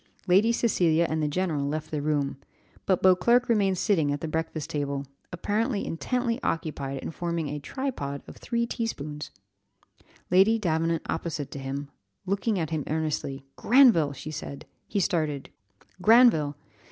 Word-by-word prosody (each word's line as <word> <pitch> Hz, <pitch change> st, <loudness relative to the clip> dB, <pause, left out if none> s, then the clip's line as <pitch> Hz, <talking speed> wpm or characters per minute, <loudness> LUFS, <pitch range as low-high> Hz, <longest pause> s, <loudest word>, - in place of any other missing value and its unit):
Lady 195 Hz, +6 st, +4 dB
Cecilia 170 Hz, -8 st, +2 dB
and 160 Hz, 0 st, -1 dB
the 150 Hz, -, +1 dB
general 150 Hz, -3 st, -1 dB
left 155 Hz, +1 st, -4 dB
the 150 Hz, -2 st, -2 dB
room, 145 Hz, -2 st, 0 dB, 0.5 s
but 190 Hz, -2 st, +2 dB
Beauclerc 190 Hz, +7 st, +5 dB
remained 200 Hz, -5 st, +2 dB
sitting 165 Hz, -8 st, +2 dB
at 145 Hz, -, -2 dB
the 165 Hz, -, -4 dB
breakfast 160 Hz, -1 st, -3 dB
table, 140 Hz, -1 st, -2 dB, 0.3 s
apparently 210 Hz, +5 st, -1 dB
intently 245 Hz, +7 st, -1 dB
occupied 145 Hz, -, -2 dB
in -, -, -4 dB
forming 170 Hz, -2 st, -3 dB
a 150 Hz, +1 st, -4 dB
tripod 145 Hz, -, -4 dB
of -, -, -11 dB
three 235 Hz, -1 st, -1 dB
tea 230 Hz, -1 st, -2 dB
spoons; 150 Hz, -6 st, -6 dB, 1.0 s
Lady 195 Hz, +5 st, +5 dB
Davenant 165 Hz, -4 st, 0 dB
opposite 160 Hz, -3 st, -3 dB
to 140 Hz, -, -6 dB
him, 140 Hz, +1 st, -5 dB, 0.3 s
looking 200 Hz, +3 st, 0 dB
at 160 Hz, -3 st, -2 dB
him 155 Hz, -2 st, -1 dB
earnestly, 150 Hz, -3 st, -2 dB
"Granville!" 225 Hz, -, +5 dB
said 145 Hz, -1 st, -7 dB, 0.2 s
she. -, -, -25 dB
He 205 Hz, -, +2 dB
started, 155 Hz, -7 st, -1 dB, 0.5 s
"Granville! 210 Hz, -, +5 dB
165 Hz, 150 wpm, -27 LUFS, 145-205 Hz, 1.0 s, Beauclerc